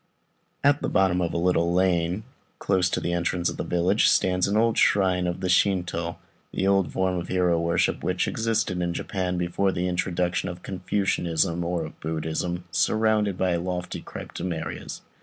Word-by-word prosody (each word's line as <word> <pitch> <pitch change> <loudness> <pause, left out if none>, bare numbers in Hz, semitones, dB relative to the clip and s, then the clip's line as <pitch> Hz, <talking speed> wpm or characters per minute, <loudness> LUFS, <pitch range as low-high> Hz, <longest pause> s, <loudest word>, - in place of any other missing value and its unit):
At 145 0 +4
the - - -1
bottom 95 -2 +2
of 85 - 0
a - - -2
little 85 -1 +2
lane, 90 +1 +1 0.3
close 95 -2 +1
to - - -1
the 85 - -2
entrance 85 0 0
of - - -6
the - - -2
village, 90 +1 +2
stands 90 0 +3
an 100 +2 +1
old 115 0 +3
shrine 95 -3 +3
of 85 - -3
the 95 - -1
Shintô 90 -3 +1 0.4
(the 95 - -1 0.2
form 95 -1 0
of 85 - -6
hero 90 -2 +2
worship 85 0 0
which - - 0
existed 110 -5 0
in 85 -1 -1
Japan 90 -2 -2
before 90 +3 0
the 90 0 -1
introduction 90 0 -1
of 90 0 -8
Confucianism 90 -3 0
or 85 -1 -1
of - - -11
Buddhism), 80 +2 -3
surrounded 110 0 +2
by 90 -2 +1
lofty 90 +1 -4
Cryptomerias. 85 -2 -6
90 Hz, 165 wpm, -25 LUFS, 85-95 Hz, 0.4 s, At